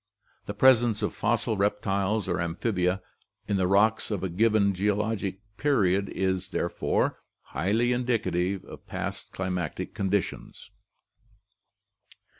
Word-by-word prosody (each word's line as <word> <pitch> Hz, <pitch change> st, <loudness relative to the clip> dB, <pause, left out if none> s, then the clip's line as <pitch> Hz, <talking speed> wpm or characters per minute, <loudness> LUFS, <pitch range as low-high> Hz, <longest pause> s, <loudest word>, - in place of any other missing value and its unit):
The 100 Hz, -, -5 dB
presence 120 Hz, -2 st, +4 dB
of -, -, -1 dB
fossil 110 Hz, 0 st, 0 dB
reptiles 100 Hz, 0 st, 0 dB
or 90 Hz, -1 st, 0 dB
amphibia 90 Hz, +2 st, -1 dB, 0.4 s
in 100 Hz, -, +1 dB
the 95 Hz, -1 st, +2 dB
rocks 105 Hz, +3 st, +3 dB
of 100 Hz, -4 st, -2 dB
a 95 Hz, -, -1 dB
given 105 Hz, +2 st, +3 dB
geo 100 Hz, +2 st, +1 dB
logic 100 Hz, -2 st, -2 dB, 0.2 s
period 100 Hz, -9 st, +2 dB
is, 95 Hz, -1 st, -1 dB
therefore, 85 Hz, -, 0 dB, 0.2 s
highly 110 Hz, +8 st, +1 dB
indicative 100 Hz, -7 st, 0 dB
of -, -, -12 dB
past -, -, -5 dB
climatic 90 Hz, -4 st, -3 dB
condi 100 Hz, 0 st, +1 dB
tions. -, -, -10 dB
100 Hz, 120 wpm, -27 LUFS, 95-110 Hz, 0.4 s, presence